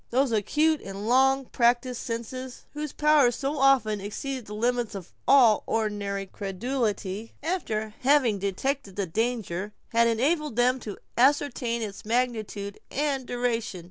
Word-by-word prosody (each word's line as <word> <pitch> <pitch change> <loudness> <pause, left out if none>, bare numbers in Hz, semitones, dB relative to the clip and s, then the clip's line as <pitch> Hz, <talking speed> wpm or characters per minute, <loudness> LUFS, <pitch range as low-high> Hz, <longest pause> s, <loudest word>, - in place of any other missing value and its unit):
Those 260 +1 +2
acute 300 +9 +2
and 195 +1 -7
long 265 +2 +4
practised 240 +1 +1
senses, 245 +2 -6
whose 300 -1 -4
powers 295 -5 +4
so 280 +2 -2
often 245 -7 +3
exceed 255 +5 -5
the 210 - -6
limits 240 0 0
of 185 -3 -8
all 245 -6 +6
ordinary 205 -3 -1
credulity, 210 +1 -3
after 220 - -2
having 255 -6 +3
detected 200 +3 -2
the 200 - -1
danger, 210 -1 -2 0.2
had 235 0 +4
enabled 285 +4 +1
them 250 +2 +3
to 210 -4 -7 0.2
ascertain 255 -3 +2
its 200 -2 -6
magnitude 220 -4 -2
and 275 -2 -1
duration. 235 -5 -1
235 Hz, 135 wpm, -27 LUFS, 210-270 Hz, 0.2 s, all